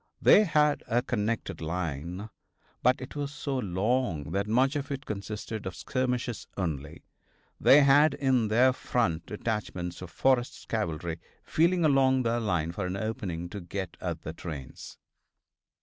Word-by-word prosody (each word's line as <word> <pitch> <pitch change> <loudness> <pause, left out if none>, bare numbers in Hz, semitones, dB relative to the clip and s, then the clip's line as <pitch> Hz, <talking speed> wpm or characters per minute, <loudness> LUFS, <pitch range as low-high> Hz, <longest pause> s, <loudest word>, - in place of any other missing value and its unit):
They 210 - +7
had 150 -3 +3
a 120 0 +1
connected 115 -6 -2
line, 85 +4 -4 0.5
but 125 +1 +3
it 130 - -8
was 145 -1 -3
so 140 -2 -3
long 95 - 0
that 100 +3 -1
much 130 +6 +2
of 140 -1 -3
it 140 0 -4
consisted 105 0 -5
of 95 - -5
skirmishers 125 -2 -2
only. 80 -4 -4 0.6
They 145 - +7
had 145 +3 +5
in 130 -5 +2
their 125 +4 +4
front 105 -11 -1
detachments 100 -6 -4
of 90 - -7
Forrest's 125 +5 +1
cavalry 85 -6 -2 0.2
feeling 170 +1 +2
along 130 -3 +4
their 115 0 +1
line 90 -7 0
for 90 +1 -3
an 90 +2 -3
opening 100 -6 -3
to 100 +2 -6
get 90 0 -5
at 85 -3 -4
the 80 - -5
trains. 75 -6 -8
110 Hz, 150 wpm, -28 LUFS, 90-130 Hz, 0.6 s, They